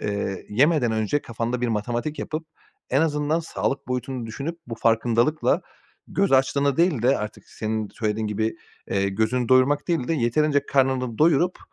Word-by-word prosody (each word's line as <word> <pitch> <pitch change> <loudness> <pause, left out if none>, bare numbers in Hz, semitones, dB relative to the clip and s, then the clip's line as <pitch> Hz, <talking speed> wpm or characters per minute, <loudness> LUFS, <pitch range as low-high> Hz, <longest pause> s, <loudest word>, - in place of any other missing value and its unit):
eee, 100 -2 -3
yemeden 130 +1 +3
önce 110 +6 0
kafanda 115 +1 -3
bir 125 - 0
matematik 120 +7 -2
yapıp, 155 +1 -4 0.4
en 135 - +3
azından 150 +1 +1
sağlık 140 -5 -3
boyutunu 125 -1 -3
düşünüp 140 +9 -5
bu 115 - -5
farkındalıkla 115 +6 +2 0.5
göz 195 -4 +1
açlığını 135 +1 +3
değil 165 -8 +2
de, 130 +3 +3
artık 105 0 -6
senin 110 -1 -3
söylediğin 110 -1 -2
gibi, 110 +1 -1 0.3
eee, 100 0 +1
gözünü 110 +5 0
doyurmak 135 +5 +3
değil 160 -8 0
de 165 - +2
yeterince 145 +3 +1
karnını 130 -4 +1
doyurup 170 +3 +3
125 Hz, 155 wpm, -24 LUFS, 110-145 Hz, 0.5 s, yemeden